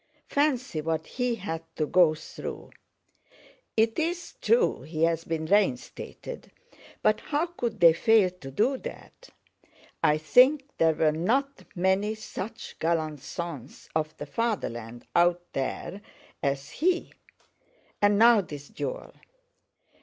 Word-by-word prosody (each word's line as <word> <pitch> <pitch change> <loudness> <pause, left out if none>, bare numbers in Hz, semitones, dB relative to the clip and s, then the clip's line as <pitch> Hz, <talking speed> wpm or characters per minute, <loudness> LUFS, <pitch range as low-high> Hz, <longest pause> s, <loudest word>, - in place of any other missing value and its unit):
Fancy 265 - +1
what 160 +1 -2
he 250 -1 -1
had 180 -6 -4
to 155 - 0
go 170 -1 +4
through! - - -8 1.1
It's 320 +11 0
true 465 0 +3
he 155 0 -3
has 165 0 +1
been 160 -1 -2
reinstated, 190 -8 -1 0.5
but 215 - +3
how 300 +2 -1
could 245 -11 -4
they 170 -2 +8
fail 210 +1 +4
to 180 -7 -10
do 230 - +1
that? - - -10 0.7
I 150 - +4
think 255 - +5 0.2
there 160 -1 +4
were 155 -1 +3
not 255 - 0
many 190 +4 +1
such 220 0 -7
gallant 155 -2 0
sons 145 -6 -7
of 155 0 -1
the - - -6
fatherland 120 - -3
out 175 0 +4
there 135 +8 -3 0.4
as 140 -2 -2
he. 355 +2 0 0.9
And 205 0 +4
now—this 200 -11 +4
duel! - - -5
180 Hz, 120 wpm, -27 LUFS, 155-235 Hz, 1.1 s, they